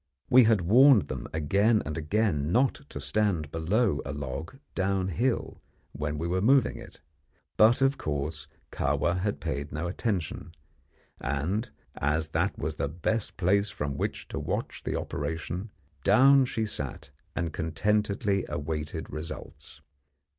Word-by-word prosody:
We 125 -1 +8
had 110 -4 +4
warned 120 +5 +6
them - - -4
again 100 +8 +2
and 75 - -4
again 80 -2 0
not 130 +6 +3 0.2
to - - -6
stand 95 -8 0
below 90 +2 +1
a 70 - -5
log 75 - -5 0.2
downhill 95 +5 -1 0.3
when 75 +1 -3
we 80 +3 -2
were 90 +2 0
moving 130 +3 +4
it, - - -12 0.5
but, 115 +5 +5
of 135 +1 +2
course, 75 +1 -3 0.2
Kahwa 85 +1 0
had 100 +2 -1
paid 70 +2 -4
no 75 +4 -3
attention, 85 -4 -3 0.6
and, 80 - -1 0.2
as 80 +2 0
that - - 0
was - - -3
the 70 0 -1
best 100 +7 -2
place 100 +3 +2
from 75 -8 -3
which - - -3
to - - -4
watch - - -3
the - - -1
operation, 85 +6 -4 0.3
down 135 +6 +6
she 115 -3 -2
sat 75 -5 -5 0.2
and 85 -3 -2
contentedly 100 +4 0
awaited 75 +1 -4
results. 75 +2 -8
90 Hz, 140 wpm, -28 LUFS, 75-110 Hz, 0.6 s, We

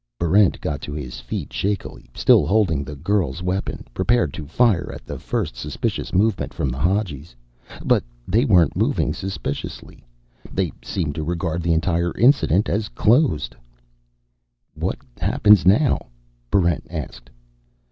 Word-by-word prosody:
Barrent 95 +3 +3
got 75 - -3
to 75 - -6
his 70 -5 -6
feet - - -6
shakily, 100 0 -3
still - - +4
holding 95 -9 +2
the 75 +2 -8
girl's 85 -1 -1
weapon, 90 +2 -3
prepared 120 - +1
to 75 -3 -7
fire 95 - +2
at - - -10
the - - -6
first - - -3
suspicious - - -3
movement 100 +2 +1
from 70 - -1
the 65 +2 -4
Hadjis. 85 - -1 0.5
But - - +3 0.2
they 110 +6 +3
weren't 90 - +4
moving - - +1
suspiciously. 95 -7 -6 0.5
They 95 -4 -1
seemed 80 -6 -2
to 80 - -4
regard 85 0 -2
the 85 0 +1
entire 85 +1 0
incident 120 - +4
as 105 +1 -1
closed. 115 - +2 1.2
"What - - -3 0.2
happens 105 - +4
now?" 120 - +3 0.4
Barrent 85 -5 +1
asked. 70 -7 -7
90 Hz, 135 wpm, -22 LUFS, 80-105 Hz, 1.2 s, still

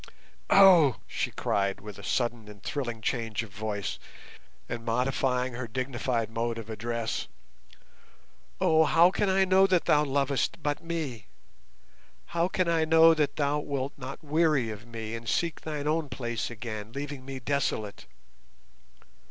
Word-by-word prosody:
"Oh!" 180 - +7
she - - -2
cried, 100 -1 -1
with 105 -2 -10
a - - -11
sudden 120 -3 -1
and 105 -2 -13
thrilling 120 -6 -3
change 115 -1 -2
of 110 - -12
voice, 105 0 -4 0.7
and 120 -1 -5
modifying 125 +1 0
her 120 0 -5
dignified 120 -2 -2
mode 115 0 -2
of 115 -1 -7
address. 115 +1 -3 1.3
"Oh, 160 0 +4
how 170 +3 +5
can 200 +1 0
I 190 0 +4
know 190 +1 +5
that 185 -3 +2
thou 150 0 +4
lovest 140 +3 0
but 145 +1 -1
me? 155 -11 -4 1.1
How 170 +1 +2
can 185 -1 0
I 165 -1 +2
know 160 +1 +7
that 150 -2 0
thou 145 0 +1
wilt 140 -2 -3
not 135 +3 -8
weary 150 -6 +2
of 110 +2 -9
me 115 -1 -6
and 115 0 -5
seek 170 -2 -1
thine 150 -2 -4
own 155 -1 0
place 120 -3 -3
again, 110 -2 -7
leaving 140 -1 -5
me 135 0 -6
desolate? 120 -6 -2
130 Hz, 150 wpm, -28 LUFS, 115-155 Hz, 1.3 s, Oh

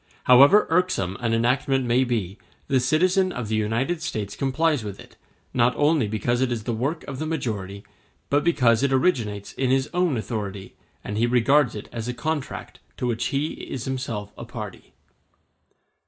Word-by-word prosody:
However 140 +11 +7
irksome 165 - +1
an 115 -2 -1
enactment 130 +3 +1
may 120 +2 +3
be, 110 -6 -2 0.3
the 135 - +2
citizen 185 +8 +2
of 125 -9 -5
the 110 - 0
United 115 +10 -1
States 105 -11 -4
complies 140 0 +1
with 100 -2 -7
it, - - -14 0.4
not 120 0 +3
only 145 -5 +2
because 120 +4 -1
it 130 -1 +1
is 115 -3 -2
the 120 - -2
work 140 +9 -2
of 135 -2 -7
the 155 - -2
majority, 105 -10 -4 0.4
but 145 +1 +2
because 125 -9 +3
it 140 -1 +1
originates 115 - 0
in 130 -1 -1
his 135 +1 +1
own 175 -6 +1
authority, 100 -4 -5 0.3
and 105 +1 -3
he 120 - +3
regards 125 +2 +3
it 105 - -7
as 115 -1 -5
a 125 - -3
contract 155 -1 -4 0.2
to - - -2
which 120 -2 -1
he 140 +3 -1
is 130 -2 -6
himself 125 -6 -4
a - - -6
party. - - -9
125 Hz, 175 wpm, -24 LUFS, 110-145 Hz, 0.4 s, However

